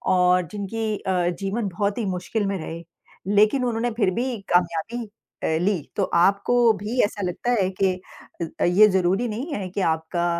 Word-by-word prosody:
और 180 -1 +3
जिनकी 210 +1 -3
अ, 180 -3 0
जीवन 200 +2 -2
बहुत 200 +3 -1
ही 230 - -1
मुश्किल 190 +3 -2
में 195 0 -1
रहे 165 0 -7 0.5
लेक़िन 215 +6 +4
उन्होंने 235 0 -1
फ़िर 215 -4 +1
भी 245 +2 -2 0.2
कामयाबी 180 +7 0 0.4
अ, - - +1
ली। 190 -3 +1
तो 200 - +1
आपको 200 +7 +3
भी 220 +6 -4
ऐसा 205 0 -2
लगता 215 +7 -2
है 185 - +1
के 190 -1 +4
अ - - -12 0.6
अ, - - +4
ये 195 +5 +6
ज़रूरी 190 +5 +1
नहीं 255 +9 -4
है 190 -2 -4
कि 195 +2 -3
आपका 160 +1 0
200 Hz, 180 wpm, -23 LUFS, 180-225 Hz, 0.6 s, ये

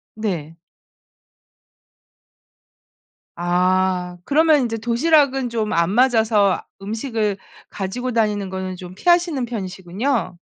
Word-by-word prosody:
네. 175 -8 -4 2.8
아 180 +1 0
그러면 310 0 +4
인제 225 -2 -2
도시락은 265 +2 +2
좀 220 -2 -2
안 170 +1 +2
맞아서 220 -4 +3 0.2
음식을 220 -1 -2 0.3
가지고 240 +6 -4
다니는 210 -4 0
거는 190 -1 -4
좀 180 0 -10
피하시는 345 - +2
편이시군요. 195 +2 -3
215 Hz, 210 characters per minute, -21 LUFS, 185-250 Hz, 2.8 s, 그러면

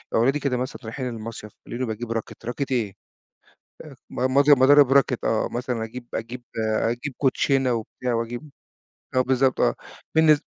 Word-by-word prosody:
أولادي 135 +6 +3
كده 130 -3 0
مثلًا 130 +2 -4
رايحين 125 +3 -4
المصيف 110 -2 -7 0.2
ويلاقوني 125 +1 -3
باجيب 110 +1 -4
راكِت، 115 0 -5
راكِت 130 +3 -3
إيه؟! 110 -6 0 0.9
آآ - - -11 0.2
م 130 +1 -1
مض 140 +1 +5
مضارب 140 0 +7
راكِت 135 -3 +3
آه. 110 - +1
مثلًا 120 -2 -2
أجيب 120 +2 -8
أجيب 120 +2 -5 0.2
أجيب 115 +5 -1
كوتشينة 135 -1 +2
وبتاع 120 +2 -3
وأجيب 120 +5 -4 0.7
آه 130 - +5
بالضبط، 130 0 +2
آه. - - +3 0.4
بالنس 155 -2 +6
125 Hz, 155 wpm, -24 LUFS, 115-135 Hz, 0.9 s, مضارب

